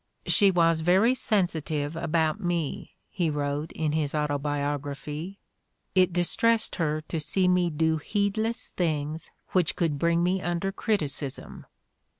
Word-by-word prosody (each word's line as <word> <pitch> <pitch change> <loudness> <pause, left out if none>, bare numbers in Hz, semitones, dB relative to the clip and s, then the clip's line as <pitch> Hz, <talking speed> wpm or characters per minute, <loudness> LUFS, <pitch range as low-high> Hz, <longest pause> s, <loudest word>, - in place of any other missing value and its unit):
"She 200 -3 +5
was 165 -3 +3
very 190 +9 +4
sensitive 160 - -1
about 160 -1 0
me," 170 -5 -3 0.2
he 175 -4 0
wrote 145 +1 -2
in 155 -2 -1
his 155 -1 -1
Autobiography. 145 +3 -3 0.6
"It 185 -1 +4
dis 175 0 +1
tressed 230 -1 +2
her 155 -2 0
to 160 +1 -4
see 185 +5 +1
me 180 -1 +3
do 160 0 +1
heedless 220 - -1
things 155 -2 -2 0.2
which 180 -4 +1
could 155 -4 0
bring 170 +1 +2
me 185 +1 +1
under 175 +2 -1
criticism." 150 - -3
165 Hz, 135 wpm, -27 LUFS, 150-185 Hz, 0.6 s, She